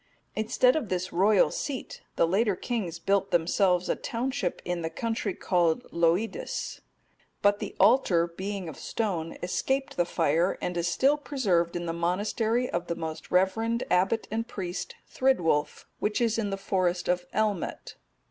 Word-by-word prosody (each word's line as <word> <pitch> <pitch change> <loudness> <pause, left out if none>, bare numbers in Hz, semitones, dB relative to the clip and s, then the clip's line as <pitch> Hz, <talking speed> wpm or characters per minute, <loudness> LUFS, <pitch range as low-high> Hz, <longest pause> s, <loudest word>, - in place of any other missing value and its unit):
Instead 245 +3 +3
of 260 -10 -2
this 185 0 -2
royal 195 +3 +4
seat 275 -3 -5
the - - +4
later 200 +3 +2
kings 185 -6 -3
built 195 +3 +1
themselves 180 +1 +2
a - - +1
township 245 -6 -2
in 175 -1 -2
the 160 - -2
country 225 +2 -2
called 170 -3 +1
Loidis.(243) 180 - -1 0.6
But 205 0 +4
the - - -5
altar, 195 -9 +5
being 190 +2 -5
of 155 - -8
stone, 175 -8 -2
escaped 265 +9 -1
the 175 - +3
fire 165 +1 +1
and 180 - -3
is 170 0 0
still 270 - +3
preserved 200 - 0
in 175 0 -2
the 165 - -2
monastery 210 +8 0
of 175 -6 -3
the 170 - -2
most 160 -1 -6
reverend 225 +6 +1
abbot 195 +5 +2
and 225 +1 -2
priest, 180 -2 -5
Thrydwulf, 170 - +1
which 210 +3 0
is 230 -2 +1
in 210 -2 -1
the 195 - -2
forest 185 -2 0
of 180 0 0
Elmet. 210 -4 -1
190 Hz, 155 wpm, -28 LUFS, 175-225 Hz, 0.6 s, altar